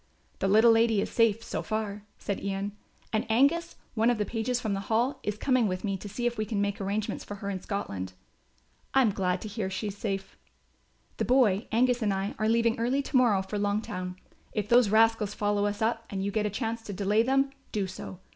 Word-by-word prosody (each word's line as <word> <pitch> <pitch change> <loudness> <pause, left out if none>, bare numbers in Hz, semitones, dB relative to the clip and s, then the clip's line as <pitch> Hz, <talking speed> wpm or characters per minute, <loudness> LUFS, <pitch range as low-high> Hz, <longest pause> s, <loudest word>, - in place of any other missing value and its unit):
"The 195 - +1
little 220 +4 +6
lady 225 -1 +4
is - - -2
safe 230 -1 +3
so - - -3
far," 210 -2 -3
said 200 - -4
Ian, 200 +1 -2 0.4
"and 215 - +2
Angus, 285 +9 +3 0.2
one 225 0 +3
of 240 - +2
the 210 - 0
pages 235 +3 -1
from 220 -4 -2
the 195 - -1
Hall, 245 +5 +1
is 210 0 -3
coming 255 -2 +2
with 185 -1 -3
me 195 -2 -1
to 205 +2 -8
see 240 +4 -4
if 240 -2 -1
we - - +2
can 210 -1 -2
make 200 0 -1
arrangements 200 +2 -2
for 205 - -7
her 200 -1 -4
in 190 -2 -4
Scotland." 95 - -4 0.8
"I 270 - +6
am 220 - +3
glad 185 -2 -1
to - - -5
hear 210 -2 -3
she 200 +3 -3
is 200 - -8
safe." 195 -2 -4 0.8
"The - - 0
boy, 240 -5 +3
Angus, 245 +2 +3
and 210 -2 +2
I 195 +2 -2
are 215 0 +2
leaving 230 +1 +2
early 255 +4 +1
to 280 - -6
morrow 230 -7 +4
for 205 +2 -4
Longtown. 200 -3 -2 0.4
If 210 -1 -1
those 240 -3 +6
rascals 220 -1 +3
follow 205 0 +1
us 205 +1 -2
up 225 0 0
and 195 -1 -3
you 200 - -1
get 210 0 0
a - - -1
chance 225 +2 -3
to 205 - -5
delay 205 +3 +2
them, 270 +3 +2 0.2
do 205 -2 0
so. 185 -1 -8
215 Hz, 225 wpm, -28 LUFS, 200-230 Hz, 0.8 s, little